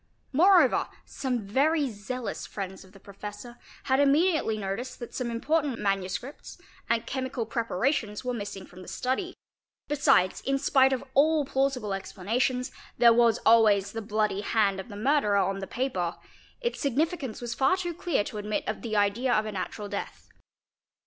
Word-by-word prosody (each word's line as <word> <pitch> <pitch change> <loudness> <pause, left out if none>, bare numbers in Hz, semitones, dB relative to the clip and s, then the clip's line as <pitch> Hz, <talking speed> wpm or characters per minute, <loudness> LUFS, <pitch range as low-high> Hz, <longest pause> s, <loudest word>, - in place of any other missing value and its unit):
4 340 +7 +5
Moreover, 385 -2 +5 0.2
some 250 -6 -3
very 285 +8 +2
zealous 225 +4 -5
friends 190 -2 -6
of 190 - -18
the 195 - -16
professor 205 +4 -9 0.2
had 265 0 +2
immediately 285 -4 +3
noticed 210 +5 -4
that 240 - -8
some 250 -2 -3
important 280 +3 0
manuscripts 195 +6 -3 0.3
and 230 -1 +1
chemical 260 -3 -3
preparations 230 0 -1
were 250 - -1
missing 200 -4 -6
from 180 - -14
the 185 - -12
study; 310 +9 -2 0.5
besides, 270 -10 +3
in 275 0 0
spite 270 -1 +4
of 265 - -1
all 300 +2 +4
plausible 265 -6 0
explanations, 230 +7 -1
_ - - -24 0.2
there 235 -1 +7
was 235 -1 +4
always 210 -3 +5
the 225 - -5
bloody 210 -2 0
hand 205 -3 +1
of 190 - -8
the 205 - -8
murderer 215 -2 +2
on 195 0 +1
the 195 - -5
paper; 190 -9 -2 0.5
its 475 -1 -2
significance 285 -2 -1
was 240 -1 -4
far 270 +9 +2
too 350 -2 -3
clear 340 - 0
to 210 - -6
admit 210 +1 -2
of 215 - -3
the 220 -2 -3
idea 205 +5 +2
of 215 -2 +2
a 215 - -4
natural 205 +1 -5
death. - - -6
235 Hz, 170 wpm, -27 LUFS, 205-270 Hz, 0.5 s, there